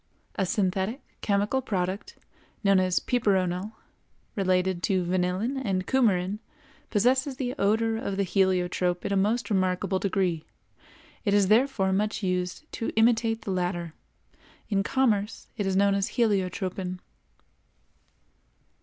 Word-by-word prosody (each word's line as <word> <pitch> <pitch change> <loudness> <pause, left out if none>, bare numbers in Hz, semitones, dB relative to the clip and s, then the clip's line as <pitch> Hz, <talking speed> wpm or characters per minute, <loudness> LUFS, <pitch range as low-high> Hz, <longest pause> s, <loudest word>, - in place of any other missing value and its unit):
A 190 - -1
synthetic, 195 +5 0 0.2
chemical 205 +6 +1
product, 190 -4 -3 0.5
known 195 -1 +5
as 185 -1 +1
piperonal, 195 -4 0 0.6
related 185 -2 +1
to 185 0 +1
vanillin 185 +9 0
and 185 -4 -1
cumarin, 205 -6 +1 0.5
possesses 260 +5 +2
the 250 -2 -2
odor 225 +2 +2
of 200 -5 -3
the 200 - +2
heliotrope 180 -1 +1
in - - 0
a - - +2
most 215 +5 +1
remarkable 185 0 +1
degree. 185 -5 0 0.8
It 205 -3 +2
is 200 -2 +3
therefore 220 -4 +3
much 210 +2 -1
used 180 +4 -1
to 225 - -3
imitate 225 0 +2
the 200 - -3
latter. 175 -3 -2 0.8
In 200 -2 +2
commerce 215 -2 0
it 205 -3 -2
is 190 - 0
known 200 +1 +4
as 195 0 0
heliotropin. 190 -4 0
195 Hz, 125 wpm, -27 LUFS, 185-220 Hz, 0.8 s, known